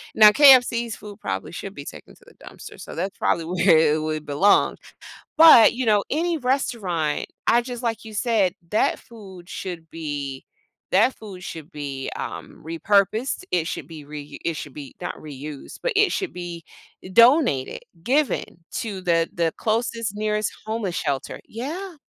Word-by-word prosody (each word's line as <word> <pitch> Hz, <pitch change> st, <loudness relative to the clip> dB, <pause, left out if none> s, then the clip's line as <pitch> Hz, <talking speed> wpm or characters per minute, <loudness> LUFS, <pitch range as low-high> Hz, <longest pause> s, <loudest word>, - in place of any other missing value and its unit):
Now 215 Hz, -1 st, +9 dB
KFC's 245 Hz, -4 st, +6 dB
food 205 Hz, -1 st, -11 dB
probably 95 Hz, -, -4 dB
should 195 Hz, +2 st, -7 dB
be 140 Hz, -, -9 dB
taken -, -, -11 dB
to -, -, -23 dB
the -, -, -19 dB
dumpster, -, -, -11 dB
so -, -, -9 dB
that's 185 Hz, +4 st, -3 dB
probably 165 Hz, -, 0 dB
where 175 Hz, 0 st, +4 dB
it 155 Hz, 0 st, +2 dB
would 155 Hz, -1 st, -3 dB
belong, 150 Hz, +8 st, +3 dB, 0.6 s
but, 315 Hz, -8 st, +9 dB
you 255 Hz, +1 st, -2 dB
know, 210 Hz, -2 st, +3 dB
any 330 Hz, +2 st, 0 dB
restaurant 210 Hz, -, -1 dB, 0.2 s
I 240 Hz, +1 st, +4 dB
just 245 Hz, 0 st, -7 dB
like 230 Hz, -2 st, -2 dB
you 220 Hz, -, -10 dB
said, 210 Hz, -5 st, +2 dB, 0.2 s
that 215 Hz, -, +2 dB
food 190 Hz, -6 st, -13 dB
should 175 Hz, -5 st, -6 dB
be 145 Hz, -4 st, -5 dB, 0.5 s
that 215 Hz, +8 st, +4 dB
food 195 Hz, -4 st, -11 dB
should 160 Hz, 0 st, -8 dB
be, 140 Hz, -4 st, -5 dB
um, -, -, -7 dB
repurposed. 200 Hz, -, +1 dB
It 170 Hz, -3 st, +1 dB
should 140 Hz, -, -5 dB
be 155 Hz, -3 st, -10 dB
reu 150 Hz, -1 st, -9 dB
it 165 Hz, -2 st, -1 dB
should 145 Hz, -2 st, -7 dB
be 140 Hz, -3 st, -9 dB
not -, -, -4 dB
reused, 145 Hz, -1 st, -9 dB
but -, -, 0 dB
it 410 Hz, -3 st, +4 dB
should 380 Hz, -2 st, -2 dB
be 175 Hz, -2 st, -7 dB, 0.5 s
donated, 235 Hz, -, +4 dB, 0.2 s
given 275 Hz, -, +1 dB, 0.3 s
to 205 Hz, -4 st, -4 dB
the 170 Hz, -2 st, +2 dB
the 165 Hz, -2 st, 0 dB
closest, 225 Hz, -1 st, -1 dB
nearest 210 Hz, 0 st, -1 dB, 0.2 s
homeless 215 Hz, -5 st, -2 dB
shelter 140 Hz, -6 st, -3 dB
yeah. 325 Hz, -, -6 dB
195 Hz, 165 wpm, -23 LUFS, 160-235 Hz, 0.6 s, Now